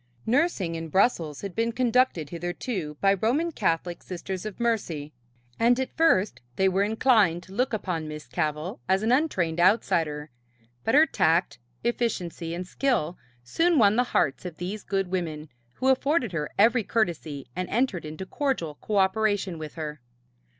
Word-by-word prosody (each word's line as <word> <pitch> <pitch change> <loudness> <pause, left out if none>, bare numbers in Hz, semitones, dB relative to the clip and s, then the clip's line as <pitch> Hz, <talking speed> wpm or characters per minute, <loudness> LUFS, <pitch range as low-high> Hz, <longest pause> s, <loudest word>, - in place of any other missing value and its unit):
Nursing 235 - +1
in 165 0 -5
Brussels 165 - +1
had 200 -2 -5
been 230 +1 +1
conducted 245 - +1
hitherto 175 - -4
by 195 0 +5
Roman 255 - +1
Catholic 175 - -1
Sisters 185 +2 -5
of 215 - -8
Mercy, 170 -11 -1 0.5
and 245 +2 +4
at 260 - -3
first 215 - +3
they 190 - +3
were 190 +1 +2
inclined 210 -5 +3
to 190 - -14
look 250 +5 0
upon 180 -7 -2
Miss 150 0 -7
Cavell 155 0 -3
as 190 +2 +3
an 225 - +2
untrained 185 - +1
outsider, 165 - +2 0.5
but 225 - +2
her 305 +2 +8
tact, 165 - +1 0.2
efficiency 180 -8 -2
and 180 +1 -4
skill 180 - 0 0.3
soon 330 - +2
won 210 -4 +5
the 250 +2 +3
hearts 135 - 0
of 175 -3 -7
these 195 +4 -4
good 195 -2 -2
women, 160 -5 -3 0.3
who 260 - +1
afforded 265 - +2
her 150 -3 -2
every 230 +3 +4
courtesy 165 - -1
and 185 0 -3
entered 230 -7 0
into 155 +4 -6
cordial 260 - -2
cooperation 200 -3 +1
with 155 -1 -7
her. 150 -3 -5
190 Hz, 155 wpm, -26 LUFS, 165-235 Hz, 0.5 s, her